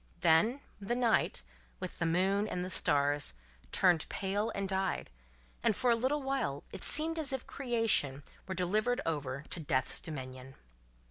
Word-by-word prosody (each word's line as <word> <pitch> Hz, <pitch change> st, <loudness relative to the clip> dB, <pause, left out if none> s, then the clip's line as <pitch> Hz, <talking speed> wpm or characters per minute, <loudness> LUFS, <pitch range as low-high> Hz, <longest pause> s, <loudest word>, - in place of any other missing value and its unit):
Then, 220 Hz, -, +4 dB, 0.2 s
the 205 Hz, +4 st, -2 dB
night, 235 Hz, -, +2 dB, 0.4 s
with -, -, -6 dB
the 170 Hz, -, +1 dB
moon 190 Hz, +5 st, +2 dB
and 180 Hz, -3 st, -2 dB
the 185 Hz, -, -6 dB
stars, 145 Hz, -, +1 dB, 0.4 s
turned 175 Hz, -4 st, +3 dB
pale 205 Hz, +3 st, -1 dB
and 195 Hz, 0 st, -1 dB
died, 190 Hz, -, -1 dB, 0.5 s
and 215 Hz, -, +3 dB
for 250 Hz, -2 st, +2 dB
a -, -, +5 dB
little 265 Hz, +5 st, 0 dB
while 260 Hz, -, -1 dB
it -, -, -8 dB
seemed 320 Hz, +2 st, +3 dB
as 295 Hz, -3 st, +1 dB
if 265 Hz, -2 st, -3 dB
Creation 225 Hz, -, +1 dB, 0.2 s
were 190 Hz, -, -3 dB
delivered 215 Hz, +7 st, +1 dB
over 140 Hz, -3 st, -2 dB
to -, -, -3 dB
Death's 140 Hz, -4 st, 0 dB
dominion. 130 Hz, -3 st, -7 dB
190 Hz, 155 wpm, -33 LUFS, 150-240 Hz, 0.5 s, a